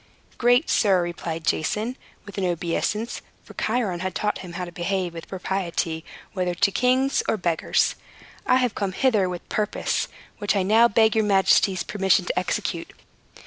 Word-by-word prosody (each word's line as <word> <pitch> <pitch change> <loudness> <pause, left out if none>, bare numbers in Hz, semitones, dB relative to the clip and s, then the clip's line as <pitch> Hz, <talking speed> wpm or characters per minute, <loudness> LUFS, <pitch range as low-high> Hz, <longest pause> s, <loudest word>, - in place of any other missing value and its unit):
"Great 245 +5 +4
sir," 190 -5 +3
replied 165 -2 -5
Jason, 215 +10 0 0.3
with 200 -1 -7
an - - -1
obeisance 180 +6 -1 0.2
for - - -14
Chiron 215 -6 -1
had 185 0 -3
taught 210 0 -1
him 180 -2 -9
how 180 +1 -4
to 175 - -9
behave 180 0 -2
with 165 -1 -8
propriety, 180 -4 -2 0.3
whether 180 -2 -1
to 200 +3 +2
kings 255 +4 +2
or - - +1
beggars 170 -4 +1 0.5
"I - - +5
have 250 -4 +2
come 195 -2 -2
hither 210 -6 +2
with 180 -1 -5
a - - -11
purpose 210 -1 -1 0.3
which 205 0 0
I 195 - +2
now 220 +5 +5
beg 220 0 +3
your 220 - +3
majesty's 190 -2 +3
permission 195 0 +2
to - - 0
execute. - - -3
195 Hz, 170 wpm, -24 LUFS, 175-220 Hz, 0.5 s, I